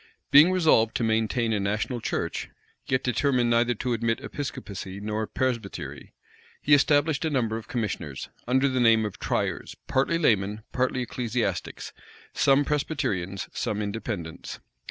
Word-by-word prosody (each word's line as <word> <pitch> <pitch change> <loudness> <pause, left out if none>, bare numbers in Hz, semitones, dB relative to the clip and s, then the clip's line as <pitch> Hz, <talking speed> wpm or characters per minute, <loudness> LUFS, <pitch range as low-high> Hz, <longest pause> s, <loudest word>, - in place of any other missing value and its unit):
Being 150 +6 +8
resolved 155 -11 +3
to - - 0
maintain 110 +1 +1
a 105 - +1
national 105 +5 -1
church, - - -3 0.4
yet 130 0 +1
determined 125 -1 +2
neither 120 +1 +3
to 125 +3 -2
admit 115 +1 0
Episcopacy 125 -9 -6
nor 105 +1 -2
Presbytery, 120 -6 -3 0.4
he 145 - +2
established 145 +1 +4
a 160 - +1
number 120 -6 0
of 110 -1 -6
commissioners, 90 - -4 0.2
under 130 +3 +3
the 130 -1 0
name 115 -2 +5
of 105 - -6
tryers, - - -2
partly 135 +6 +1
laymen, 105 - +1
partly 130 0 0
ecclesiastics, 115 -6 -3 0.4
some 140 +1 +4
Presbyterians, 100 - -2
some 105 - -2
Independents. 100 -6 -5
115 Hz, 135 wpm, -26 LUFS, 105-135 Hz, 0.4 s, Being